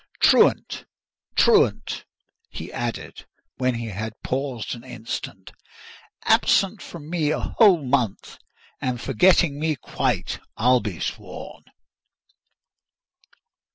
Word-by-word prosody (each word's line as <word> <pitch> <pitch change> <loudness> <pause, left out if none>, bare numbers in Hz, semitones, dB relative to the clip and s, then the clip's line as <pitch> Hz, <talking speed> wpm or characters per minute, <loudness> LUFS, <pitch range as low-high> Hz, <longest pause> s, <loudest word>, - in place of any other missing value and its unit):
Truant! - - +4 0.5
truant!" 450 -1 +3 0.4
he - - -8
added, - - -5 0.3
when 130 -1 +1
he 115 -1 -4
had 110 +3 -6
paused 130 -3 -3
an 120 - -9
instant. 110 -6 -7 0.7
"Absent 195 +1 +3
from 155 -4 -10
me 160 -3 0
a - - 0 0.2
whole 185 -10 +6
month, 125 -6 -1 0.4
and 125 -2 -1
forgetting 145 - +3
me 155 0 0
quite, 120 - -2 0.2
I'll 125 +2 +4
be 100 -8 -5
sworn!" - - -6
130 Hz, 100 wpm, -24 LUFS, 115-160 Hz, 0.7 s, whole